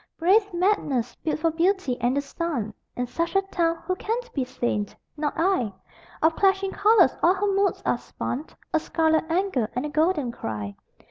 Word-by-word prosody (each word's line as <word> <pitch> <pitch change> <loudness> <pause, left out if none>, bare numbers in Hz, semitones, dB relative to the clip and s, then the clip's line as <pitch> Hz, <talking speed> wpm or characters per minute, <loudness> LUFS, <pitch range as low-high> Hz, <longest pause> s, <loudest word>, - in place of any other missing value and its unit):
Brave 400 +5 +3
madness, 320 - +1
built 310 - -2
for 330 0 +2
beauty 340 -4 +1
and 245 +3 +2
the - - +2
sun 280 -7 -3 0.2
In 250 - -1
such 335 +9 -3
a 390 - +4
town 340 -3 0
who 370 - 0
can 450 +4 -1 0.2
be 270 - 0
sane? 240 -5 -1 0.3
Not 295 -1 -2
I. 330 - +2 0.5
Of 320 +1 +4
clashing 390 0 +2
colors 405 - +5
all 355 +3 +5
her 400 +1 0
moods 395 0 +1
are - - +1
spun 280 +6 -5 0.3
A 320 - +4
scarlet 320 0 +1
anger 330 - 0
and 250 - -1
a - - -3
golden 310 -4 +1
cry. 105 - -5
325 Hz, 180 wpm, -25 LUFS, 255-380 Hz, 0.5 s, colors